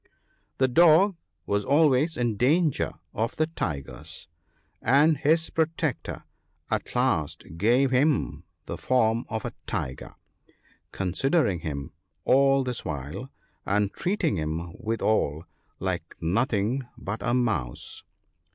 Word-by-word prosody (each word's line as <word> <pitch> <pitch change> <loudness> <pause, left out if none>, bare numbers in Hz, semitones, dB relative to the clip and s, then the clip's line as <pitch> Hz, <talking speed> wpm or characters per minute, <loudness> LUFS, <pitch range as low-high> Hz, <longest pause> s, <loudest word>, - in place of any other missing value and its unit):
The 130 - +3
dog 170 +7 +5 0.3
was 100 0 0
always 150 +2 +3
in 120 -3 0
danger 150 - +2 0.2
of 115 +3 -1
the 155 - +2
tigers, 80 - -5 0.5
and 145 +6 +5
his 160 +4 +2
protector 160 -2 -1 0.5
at - - -2
last 75 -2 +1
gave 120 +9 +3
him 140 +2 +1 0.2
the - - -6
form 115 -2 +2
of 110 -1 -3
a - - -4
tiger 65 0 -4 0.4
— - - -41 0.3
considering 100 - +1
him 70 -4 -5 0.3
all 135 0 +4
this 125 -2 -3
while, 75 - -5 0.3
and 100 0 +1
treating 180 - 0
him 80 +2 -3
withal, 110 -9 0 0.4
like - - -3
nothing 110 +6 +1 0.2
but 105 +2 -4
a 120 +3 +1
mouse. 110 - -1
120 Hz, 115 wpm, -26 LUFS, 95-145 Hz, 0.5 s, dog